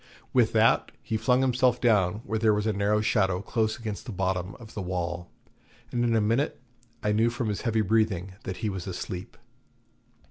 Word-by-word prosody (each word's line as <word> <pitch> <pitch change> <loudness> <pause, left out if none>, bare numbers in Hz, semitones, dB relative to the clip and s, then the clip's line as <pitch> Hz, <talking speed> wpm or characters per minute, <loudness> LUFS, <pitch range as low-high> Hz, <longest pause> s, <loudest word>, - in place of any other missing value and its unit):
With - - +4
that - - +4
he 110 - -2
flung 125 +4 +3
himself 125 -1 +2
down 105 -4 +2
where 110 +2 -1
there 110 -1 +4
was 105 0 -1
a 110 - +1
narrow 105 +2 +2
shadow 95 -4 +2
close 110 +2 -1
against 110 0 -6
the - - -4
bottom 95 -1 -2
of 115 -2 -13
the 105 - -4
wall, 90 -1 -3 0.6
and 120 0 0
in 115 -1 +2
a - - +4
minute 115 +7 +1 0.4
I 105 - +2
knew 110 +3 +3
from 120 -1 -2
his 105 - -2
heavy 110 -2 +1
breathing 100 -3 +1
that 95 - -5
he - - +2
was 95 -2 -5
asleep. 90 0 -6
105 Hz, 190 wpm, -27 LUFS, 95-115 Hz, 0.6 s, With